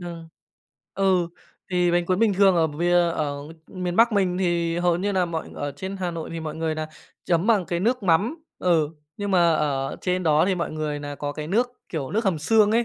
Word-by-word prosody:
Thường 170 -2 -8 0.7
ừ, 185 -3 +2 0.4
thì 180 -1 +2
bánh 175 0 +2
cuốn 185 0 +1
bình 220 -3 +3
thường 195 -2 +5
ở 160 -1 +4
vìa 170 +4 0 0.2
ở 150 -3 -2 0.3
miền 180 -2 -4
Bắc 230 +1 +5
mình 190 -3 +1
thì 170 -2 0
hầu 175 -1 +2
như 200 +3 -1
nà 185 -2 +2
mọi 165 -2 -4
ở 145 0 -4
trên 190 +6 -6
Hà 180 -2 -2
Nội 165 -1 -6
thì 165 - -4
mọi 155 0 -5
người 160 -1 -1
nà 155 0 -4 0.4
chấm 175 +2 +1
bằng 210 -6 +3
cái 170 -1 -2
nước 240 +3 +1
mắm. 205 - +1 0.2
Ừ, 165 -5 +2 0.3
nhưng 205 -1 -3
mà 175 -3 +4
ở 140 -3 -1
trên 180 0 0
đó 155 -2 +4
thì 190 - +2
mọi 170 -2 -2
người 155 -1 -3
nà 145 0 -6
có 145 0 -4
cái 150 +1 -6
nước, 230 +9 +1 0.2
kiểu, 145 -6 -4
nước 220 +2 0
hầm 180 -5 +1
xương 210 +6 +4
ấy. 235 +1 +3
175 Hz, 230 wpm, -24 LUFS, 160-195 Hz, 0.7 s, thường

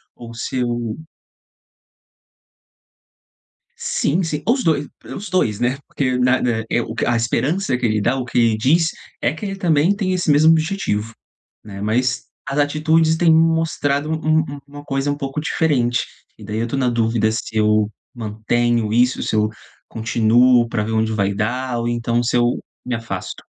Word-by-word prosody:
ou 115 -1 -10
se 115 +3 -4
eu 120 -2 -2 2.8
Sim, 170 +6 0
sim, 155 -3 -3
os 255 +2 +2
2 150 -3 +1 0.3
os 205 +1 -6
2, 110 - 0
né? 125 +2 +1
Porque 130 -2 -1
na 125 +1 +3
na 115 -2 0
eh, - - +2
o 115 -1 -5
que - - -1
a 120 - +1
esperança 130 +8 0
que 125 - -5
ele 110 -2 +1
dá, 120 +6 +1
o 130 - -2
que 120 - -2
ele 115 -2 +3
diz, 160 +9 +3 0.3
é - - 0
que 160 - -7
ele 195 -1 -3
também 170 0 +2
tem 195 -2 -1
esse 180 -3 0
mesmo 150 +2 +6
objetivo, 155 - -1 0.5
né, 100 -2 -8
mas 120 +4 0 0.2
as 140 +1 -2
atitudes 155 +2 +2
têm 170 -1 +4
mostrado 160 -3 +1
um 155 0 +1
um 145 -2 -5
uma 145 0 -11
coisa 135 0 -1
um 145 - -1
pouco 135 0 -4
diferente 130 -7 +1 0.3
e - - -12
daí 105 - -4
eu 115 - 0
estou 120 +4 -3
na 130 -2 +2
dúvida 115 -2 +1
se 110 0 -4
eu 105 0 +2 0.2
mantenho 115 0 0
isso, 125 +2 +2
se - - -1
eu 105 0 +2 0.4
continuo 120 +2 +3
para 115 -2 -1
ver 110 +1 -3
onde 110 0 +1
vai 100 -2 0
dar, 120 +4 -2
ou 115 - -2
então, 120 0 0
se 120 - -1
eu 120 0 +3 0.3
me 125 - -2
afasto. 110 -5 -6
125 Hz, 180 wpm, -20 LUFS, 115-150 Hz, 2.8 s, mesmo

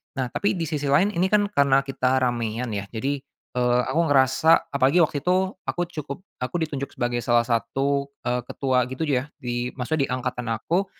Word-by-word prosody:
nah 130 -3 -2
tapi 200 +11 0
di 170 - -2
sisi 145 -2 -2
lain 160 +9 +4
ini 175 +2 +2
kan 205 0 +2
karena 140 -5 +4
kita 130 -1 +1
ramean 120 -1 -1
ya 100 0 -3
jadi, 135 +6 -1 0.4
eee, 125 0 +3
aku 165 - 0
ngerasa 135 +5 +4
apalagi 140 +5 +3
waktu 155 -3 +2
itu 185 +1 +1
aku 175 - -2
cukup 150 -1 -6 0.2
aku 125 +7 -4
ditunjuk 140 -3 -3
sebagai 120 0 -1
salah 120 -1 +4
satu, 135 +5 0 0.2
eee, 125 0 -1
ketua 130 -3 0
gitu 130 - -7
ya 130 -1 +1 0.2
di 120 0 -3
maksudnya 135 +2 -1
di - - -13
angkatan 125 -2 -2
aku 175 - 0
135 Hz, 185 wpm, -24 LUFS, 125-155 Hz, 0.4 s, lain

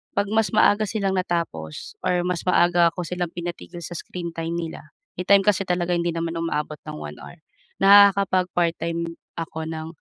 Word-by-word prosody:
'pag 200 0 +1
mas 220 0 +2
maaga 215 0 +5
silang 195 -2 -1
natapos 170 - -3
or 180 -1 +1
mas 180 -2 -2
maaga 175 -1 +4
ako 180 0 -5
silang 180 -2 -3
pinatigil 175 0 -7
sa 175 - -7
screen 170 +1 -6
time 165 0 -3
nila- 165 -2 -6 0.3
may - - -1
time 200 0 +6
kasi 200 -1 +3
talaga 175 -1 0
hindi 170 0 0
naman 165 0 -2
umaabot 155 -2 -2
ng - - -6
1 75 0 -7
hour- 175 - -12 0.4
nakakapag-part-time 180 -4 +4 0.2
ako 160 -1 -5
ng 160 0 -5
175 Hz, 170 wpm, -23 LUFS, 165-185 Hz, 0.4 s, time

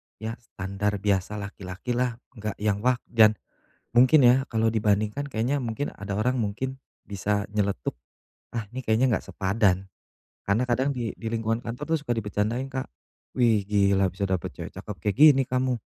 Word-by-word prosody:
ya 110 +2 -6
standar 100 -1 -3
biasa 100 0 +1
laki-laki 100 0 -6
lah, 120 -1 0 0.2
enggak 105 -2 -5
yang 105 -2 +1
wah, 125 +3 +3 0.2
dan 110 -2 +6 0.6
mungkin 130 +5 +6
ya 130 +2 +5
kalau 115 -1 +1
dibandingkan 105 +5 0
kayaknya 130 +2 0
mungkin 120 +2 -3
ada 100 -1 -4
orang 125 +5 +1
mungkin 125 +5 -2 0.2
bisa 100 +1 -1
nyeletuk, 100 - -1 0.5
"Ah 115 -3 -4
ini 130 +4 -7
kayaknya 115 +2 +3
enggak - - -4
sepadan." 95 -1 +1 0.6
karena 110 +6 +1
kadang 130 +4 +2
di 120 -3 -3
di 115 - -6
lingkungan 115 0 0
kantor 125 +7 -6
tuh - - +1
suka 120 - +1
dibecandain 115 +4 -2
Kak, 130 0 -3 0.5
"Wih 115 -5 +3
gila 100 -2 +3
bisa 100 0 -2
dapet 95 -3 -2
cewek - - -7
cakep 105 - -7
kayak 105 +2 0
gini 145 -2 +8
kamu, 130 0 +1
110 Hz, 165 wpm, -26 LUFS, 100-125 Hz, 0.6 s, gini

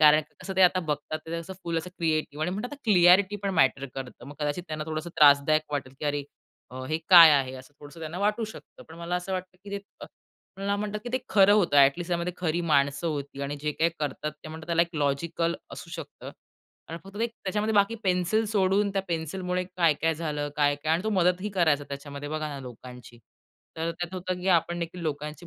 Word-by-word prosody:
कारण 150 0 +7 0.2
कसं 190 -1 -6
ते 190 - +5
आता 185 +1 +5
बघतात 150 +1 -2
ते 165 - -4
असं 165 +2 -5
फुल 165 -1 -1
असं 180 +2 -7
क्रिएटिव्ह 155 -2 -1
आणि 180 - -1
म्हणतात 210 +8 -4
आता 290 - -9
क्लॅरिटी 190 0 +5
पण 200 - 0
मॅटर 135 -2 +3
करतं. 130 -2 -8
मग 145 - -9
कदाचित 150 +4 -2
त्यांना 155 0 -4
थोडंसं 155 +2 -4
त्रासदायक 150 +1 +6
वाटेल, 130 -2 -3
की - - -4
"अरे 145 0 -1 0.5
अ, 130 +1 -7
हे 155 +1 0
काय 170 -3 +11
आहे?" 135 -3 +2
असं 130 +3 -12
थोडसं 145 +3 -12
त्यांना 160 +3 -5
वाटू 210 +3 +1
शकतं. 220 - -12
पण 160 - -11
मला 170 +1 -3
असं 180 +2 -5
वाटतं, 185 0 -5
की 200 - -9
ते - - -14 0.2
अ, - - -7 0.5
मला 200 +1 -1
म्हणतात, 210 0 -3
की - - -4
ते 255 - +2
खरं 200 -1 +6
होतं, 185 -8 +3
ॲट 140 0 +7
लीस्ट 175 +1 -5
त्यामध्ये 175 +1 -1
खरी 175 -1 -1
माणसं 140 +3 +2
होती 140 -3 -4
आणि 145 +1 -3
जे 150 - -1
काही 165 +3 +1
करतात 150 0 -3
ते 155 - -7
म्हणतात 160 0 -9
त्याला 170 0 +3
एक 170 0 -6
लॉजिकल 165 +4 0 0.2
असू - - -9
शकतं - - -8 0.6
आणि 165 +1 -6
फक्त 195 +1 -12
ते 230 - +1
एक, 235 - -3
त्याच्यामध्ये 210 +3 0
बाकी 200 +2 +3
पेन्सिल 185 +4 +2
सोडून 200 -1 +2
त्या 195 -1 0
पेन्सिलमुळे 180 +3 -2
काय-काय 165 -3 +1
झालं 150 -2 -3
काय-काय 145 +1 +1
आणि 170 +3 +1
तो 220 - 0
मदतही 185 0 +2
करायचा 160 -7 +2
त्याच्यामध्ये 140 +1 -7
बघा 155 0 -3
ना, 145 -2 -6
लोकांची. 125 -1 -11 0.6
तर 165 +1 -1
त्यात 175 +2 -6
होतं, 185 0 -3
की 190 - -2
आपण 175 -1 +2
देखील 170 +2 -5
लोकांची 150 +2 -4
165 Hz, 215 wpm, -27 LUFS, 145-185 Hz, 0.6 s, काय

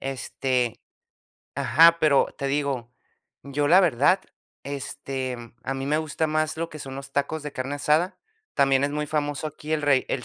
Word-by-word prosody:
Este 130 -2 -2 0.7
ajá, 165 +2 +5
pero 150 -3 +4
te 140 - -2
digo, 135 -4 -1 0.5
yo 145 +1 -1
la 180 +3 +7
verdad, 175 +2 +3 0.4
este, 135 -2 -4
mm, 120 -1 -12
a 135 +2 -3
mí 135 0 -4
me 150 +2 +2
gusta 160 0 -1
más 155 0 0
lo 165 +1 -3
que 155 - -9
son 135 -2 -7
los 135 0 -8
tacos 145 +2 -1
de 150 -1 -6
carne 130 +2 -3
asada. 155 +6 +1 0.4
También 135 -1 +3
es 140 - +1
muy 150 +1 -2
famoso 145 0 -2
aquí 155 +1 -6
el 155 -1 0
re 145 -2 +3
el 125 - -2
145 Hz, 180 wpm, -25 LUFS, 135-155 Hz, 0.7 s, la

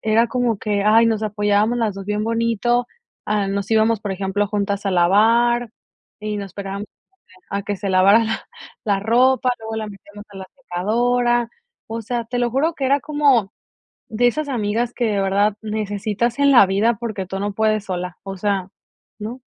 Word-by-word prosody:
era 220 +2 +3
como 245 -4 0
que, 205 -1 -1
ay, 225 +2 +5
nos 220 -1 0
apoyábamos 210 +2 +1
las 220 -4 0
2 195 0 -7
bien 210 0 -1
bonito, 230 +1 0 0.4
ah, 210 -2 0
nos 200 0 -2
íbamos, 220 0 +3
por 205 -2 -3
ejemplo, 195 +2 -1
juntas 200 0 -2
a - - +1
lavar, 225 +6 +3 0.5
y 210 0 -3
nos 200 - -5
esperábamos 200 +2 -6 0.6
a 200 0 -3
que 205 0 -3
se 200 0 -4
lavara 195 +4 +5
la 225 0 -4 0.4
la 200 -2 +1
ropa, 250 +4 +3
luego 220 0 -6
la 220 -1 -3
metíamos 205 +1 -12
a 200 - -12
la 190 - -7 0.2
secadora. 240 +5 +1 0.4
O 225 +1 -4
sea, 235 +1 -3
te 245 +2 -3
lo 240 -1 +1
juro 305 +6 +1
que 270 - -2
era 280 +2 +3
como 280 -8 +2 0.6
de 245 +3 +2
esas 305 +5 -1
amigas 230 0 -1
que 240 - -1
de 205 -2 0
verdad 200 +2 +1
necesitas 215 +3 -2
en 280 0 +5
la 240 -7 +8
vida 205 +4 +1
porque 215 -5 -4
tú 190 +1 -5
no 205 0 -2
puedes 215 0 +1
sola. 180 -1 -4
O 195 -1 -6
sea, 195 -1 -1 0.5
¿no? 230 +5 -6
215 Hz, 185 wpm, -20 LUFS, 200-235 Hz, 0.6 s, la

